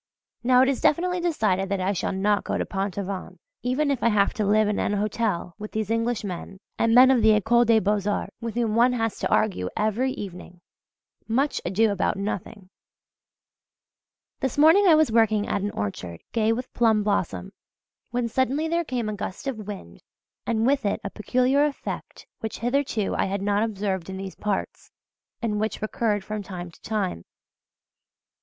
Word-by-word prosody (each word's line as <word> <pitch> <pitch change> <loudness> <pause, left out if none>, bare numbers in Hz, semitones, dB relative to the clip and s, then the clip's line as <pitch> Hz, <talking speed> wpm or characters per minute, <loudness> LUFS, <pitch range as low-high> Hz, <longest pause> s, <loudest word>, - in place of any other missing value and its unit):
Now 250 +1 +5
it - - +2
is 275 -1 0
definitely 360 +3 +2
decided 215 - 0
that 200 -1 -1
I 190 +2 0
shall 185 - -2
not 200 +1 +1
go - - -2
to - - -1
Pont 195 0 -3
Aven 195 -1 -5 0.2
if 275 +1 0
I 235 - +4
have 205 -2 +2
to 215 - -1
live 215 +1 +4
in 210 - 0
an - - 0
hotel 205 -4 -1
with 210 0 -7
these 220 -1 -2
Englishmen 215 -5 -2 0.2
and 230 0 +3
men 255 +1 +8
of 250 -3 +3
the 220 0 +6
Ecole 235 +4 +3
des 225 -1 +5
Beaux 205 +1 0
Arts, 205 - -2
with 230 -1 -4
whom 230 -3 0
one 240 +3 +4
has 225 -3 -1
to - - -1
argue 190 - +1
every 220 +5 +1
evening 180 -2 -8 0.7
much 265 +6 0
ado 210 +4 +2
about 200 -1 0
nothing! 200 -1 -5 1.7
This 265 -1 -2
morning 325 +7 +6
I 330 - +7
was 310 -6 +3
working 220 -2 +3
at 200 - -1
an 205 - -1
orchard 95 - -5
gay 225 -1 +2
with 250 +3 -3
plum 220 -3 +3
blossom, 185 - -1 0.6
when 245 0 -1
suddenly 265 +6 0
there 335 +1 0
came 250 -7 -3
a 215 - -2
gust 200 +1 -6
of 220 -7 -4
wind 85 - -8 0.5
and 225 -1 +1
with 275 0 +2
it 200 - 0
a 200 - -4
peculiar 255 +6 +2
effect 295 -2 -4
which 220 - -5
hitherto 245 -4 0
I - - +1
had 195 0 -2
not 205 0 +1
observed 195 -5 -2
in 190 - -5
these 190 0 -6
parts, 205 -2 -4 0.5
and 210 -2 0
which 220 +1 -2
recurred 215 -1 -1
from 215 +1 -4
time 180 -3 -7
to - - -21
time. 195 - -2
215 Hz, 180 wpm, -25 LUFS, 200-245 Hz, 1.7 s, men